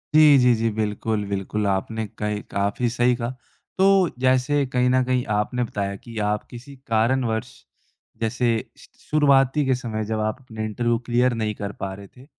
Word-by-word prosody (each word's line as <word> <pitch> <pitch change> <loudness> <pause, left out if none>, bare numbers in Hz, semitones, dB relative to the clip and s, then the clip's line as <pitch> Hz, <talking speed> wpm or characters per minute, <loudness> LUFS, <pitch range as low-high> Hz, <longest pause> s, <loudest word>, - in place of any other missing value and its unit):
जी, 150 -2 +8
जी, 125 -1 +5
जी। 115 0 0
बिल्कुल, 105 0 -2
बिल्कुल 100 +1 -2
आपने 110 +3 -1
कई 105 -1 -2
काफ़ी 100 +4 0
सही 120 +1 +2
कहा। 120 -1 -3 0.5
तो 190 - +4 0.3
जैसे 130 +3 +2
कहीं 125 0 +3
न 130 0 +3
कहीं 125 -1 0
आपने 125 +4 0
बताया 100 -3 -3
कि 115 -2 -10
आप 105 0 -1
किसी 125 +4 -11
कारणवश 115 0 +1 0.7
जैसे 120 +2 0 0.3
श - - -16
शुरुआती 140 -1 +3
के 130 -1 +2
समय 115 -4 -4
जब 110 +1 -2
आप 110 0 -1
अपने 110 -4 -6
इंटरव्यू 120 +2 0
क्लियर 120 +1 +2
नहीं 110 -2 -2
कर 100 0 -5
पा 95 0 -4
रहे 100 0 -10
थे, 125 +5 -17
115 Hz, 175 wpm, -23 LUFS, 105-125 Hz, 0.7 s, जी